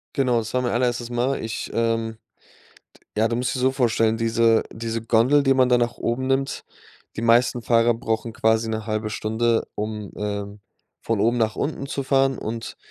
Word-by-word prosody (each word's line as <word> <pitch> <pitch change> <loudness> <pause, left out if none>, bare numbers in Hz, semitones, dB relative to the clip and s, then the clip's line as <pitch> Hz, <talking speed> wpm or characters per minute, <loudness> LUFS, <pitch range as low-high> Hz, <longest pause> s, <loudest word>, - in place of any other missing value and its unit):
Genau, 125 -4 +2
das 110 +1 -6
war 125 - +1
mein 125 - -1
allererstes 120 0 0
Mal. 125 +3 -1
Ich, 110 - -4
ähm 115 -1 -1 1.0
ja, 110 +1 +3
du 115 - -1
musst 125 +2 -1
dich 125 - -3
so 130 - +4
vorstellen, 115 -4 +2
diese 115 0 +3
diese 115 0 -4
Gondel, 120 +6 +3
die 135 -1 +3
man 130 -1 +4
da 125 - +5
nach 120 -1 -1
oben 125 +3 -2
nimmt 135 +1 -1 0.5
die 110 - -3
meisten 120 +1 +3
Fahrer 115 0 +3
brauchen 115 0 -3
quasi 110 -2 +2
1/2 110 0 -2
Stunde, 115 +2 0
um, 105 -1 -5
ähm, 100 0 -4 0.4
von 115 -2 -1
oben 120 +2 +2
nach 110 -1 0
unten 140 -2 -3
zu 140 0 -3
fahren 135 0 +2
und 115 +1 -5
115 Hz, 180 wpm, -23 LUFS, 110-125 Hz, 1.0 s, da